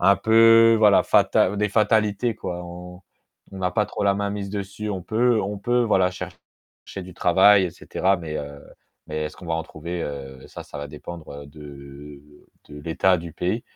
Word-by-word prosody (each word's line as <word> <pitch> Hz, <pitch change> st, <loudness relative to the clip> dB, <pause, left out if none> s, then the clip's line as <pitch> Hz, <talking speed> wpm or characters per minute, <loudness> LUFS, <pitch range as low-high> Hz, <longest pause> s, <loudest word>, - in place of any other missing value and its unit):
un 100 Hz, +2 st, +5 dB
peu, 115 Hz, 0 st, +6 dB
voilà, 105 Hz, -2 st, +5 dB
fatal 100 Hz, +3 st, +3 dB
des 105 Hz, +1 st, 0 dB
fatalités, 110 Hz, +2 st, +1 dB
quoi, 90 Hz, -4 st, -6 dB
on 90 Hz, +1 st, -10 dB, 0.5 s
on -, -, -9 dB
n'a 90 Hz, -1 st, -1 dB
pas 105 Hz, +3 st, 0 dB
trop -, -, -5 dB
la 100 Hz, -, +4 dB
main 100 Hz, 0 st, -2 dB
mise 100 Hz, -1 st, -5 dB
dessus. 100 Hz, +1 st, -5 dB
On 95 Hz, -3 st, -4 dB
peut 115 Hz, +3 st, +1 dB
on 100 Hz, +1 st, -4 dB
peut, 120 Hz, +4 st, +1 dB
voilà, 95 Hz, -5 st, +2 dB
chercher 90 Hz, +1 st, -11 dB
du 90 Hz, 0 st, -12 dB
travail 95 Hz, +3 st, +5 dB
et 90 Hz, -, -3 dB
cetera 95 Hz, +3 st, -1 dB
mais, 80 Hz, -3 st, -6 dB
heu, 70 Hz, 0 st, -7 dB, 0.5 s
mais 75 Hz, 0 st, -4 dB
est-ce 75 Hz, -, -7 dB
qu'on 90 Hz, -, -12 dB
va 85 Hz, -, -1 dB
en 80 Hz, -, -2 dB
trouver, 85 Hz, +2 st, -6 dB
heu, 65 Hz, -2 st, -7 dB
ça, -, -, -10 dB
ça -, -, -11 dB
va 70 Hz, 0 st, -6 dB
dépendre, 80 Hz, +2 st, -10 dB
heu, -, -, -13 dB
de 70 Hz, -1 st, -12 dB, 0.5 s
de 75 Hz, 0 st, -10 dB
l'état 85 Hz, +4 st, +1 dB
du 85 Hz, -1 st, -8 dB
pays. 105 Hz, +9 st, -2 dB
90 Hz, 195 wpm, -23 LUFS, 80-105 Hz, 0.5 s, peu